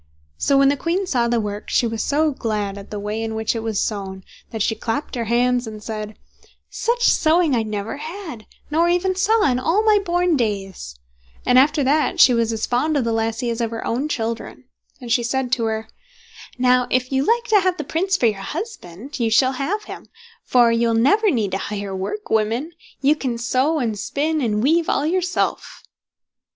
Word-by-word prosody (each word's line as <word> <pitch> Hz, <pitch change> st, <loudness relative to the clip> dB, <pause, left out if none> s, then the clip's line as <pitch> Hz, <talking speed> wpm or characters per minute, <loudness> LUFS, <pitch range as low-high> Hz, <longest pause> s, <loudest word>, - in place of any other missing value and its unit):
So, 275 Hz, -, +3 dB
when 275 Hz, 0 st, +5 dB
the 285 Hz, -, +2 dB
queen 345 Hz, +7 st, -1 dB
saw 245 Hz, -9 st, +1 dB
the 235 Hz, 0 st, +1 dB
work, 205 Hz, -1 st, -5 dB
she -, -, +2 dB
was 225 Hz, -1 st, -2 dB
so 305 Hz, +2 st, +1 dB
glad 210 Hz, -6 st, -3 dB
at 200 Hz, -1 st, -10 dB
the 210 Hz, -, -5 dB
way 210 Hz, +2 st, -3 dB
in 225 Hz, 0 st, -3 dB
which 220 Hz, +1 st, -1 dB
it 225 Hz, -, -2 dB
was 220 Hz, -2 st, -2 dB
sewn, 190 Hz, -3 st, -3 dB, 0.3 s
that 220 Hz, -2 st, -2 dB
she 225 Hz, -, +1 dB
clapped 225 Hz, +6 st, -4 dB
her 235 Hz, -3 st, -2 dB
hands, 245 Hz, +1 st, +1 dB
and 215 Hz, -1 st, -8 dB
said: 215 Hz, -1 st, -6 dB, 0.5 s
"Such 475 Hz, +1 st, -1 dB
sewing 320 Hz, -3 st, +3 dB
I 230 Hz, -, +2 dB
never 215 Hz, +1 st, -4 dB
had, 315 Hz, -, -8 dB, 0.2 s
nor 335 Hz, +3 st, +3 dB
even 360 Hz, +2 st, +1 dB
saw 425 Hz, +4 st, +2 dB
in 250 Hz, -3 st, +2 dB
all 345 Hz, +11 st, +1 dB
my 425 Hz, -1 st, +4 dB
born 355 Hz, -1 st, +1 dB
days"; 195 Hz, -, -3 dB, 0.5 s
and 250 Hz, +1 st, +5 dB
after 295 Hz, +2 st, +3 dB
that 305 Hz, +6 st, +1 dB
she 255 Hz, -, +7 dB
was 230 Hz, -1 st, +1 dB
as 220 Hz, -1 st, -2 dB
fond 295 Hz, +5 st, 0 dB
of 270 Hz, -, +1 dB
the 230 Hz, -1 st, -1 dB
lassie 225 Hz, +2 st, -1 dB
as 230 Hz, +1 st, -3 dB
of 230 Hz, -, 0 dB
her 230 Hz, 0 st, -6 dB
own 265 Hz, +6 st, -1 dB
children; 230 Hz, -2 st, -4 dB, 0.4 s
and 245 Hz, -3 st, -7 dB
she 240 Hz, -, +3 dB
said 250 Hz, +1 st, -2 dB
to 240 Hz, -3 st, +1 dB
her: 220 Hz, 0 st, -2 dB, 0.7 s
"Now, 250 Hz, 0 st, +3 dB
if 255 Hz, +1 st, 0 dB
you 265 Hz, 0 st, +1 dB
like 465 Hz, +8 st, +2 dB
to 425 Hz, -2 st, +6 dB
have 370 Hz, -1 st, 0 dB
the 305 Hz, -, -3 dB
Prince 370 Hz, +6 st, 0 dB
for 245 Hz, -, +1 dB
your 210 Hz, -4 st, +1 dB
husband, 280 Hz, -, -7 dB
you 230 Hz, -2 st, +1 dB
shall 255 Hz, +4 st, +4 dB
have 305 Hz, +11 st, -2 dB
him; -, -, -10 dB, 0.4 s
for 240 Hz, -2 st, +4 dB
you 230 Hz, 0 st, +2 dB
will 230 Hz, -, +1 dB
never 405 Hz, -, +3 dB
need 220 Hz, -, 0 dB
to 195 Hz, -, -1 dB
hire 200 Hz, -1 st, -4 dB
work 305 Hz, -, -5 dB
women. 225 Hz, +8 st, 0 dB, 0.3 s
You 285 Hz, +2 st, +4 dB
can 255 Hz, -5 st, -3 dB
sew, 260 Hz, +6 st, +1 dB
and 225 Hz, -7 st, -2 dB
spin, 305 Hz, +7 st, -1 dB
and 215 Hz, -3 st, 0 dB
weave 325 Hz, +4 st, +2 dB
all 285 Hz, -, +1 dB
yourself." 360 Hz, +2 st, -1 dB
250 Hz, 210 wpm, -21 LUFS, 225-310 Hz, 0.7 s, she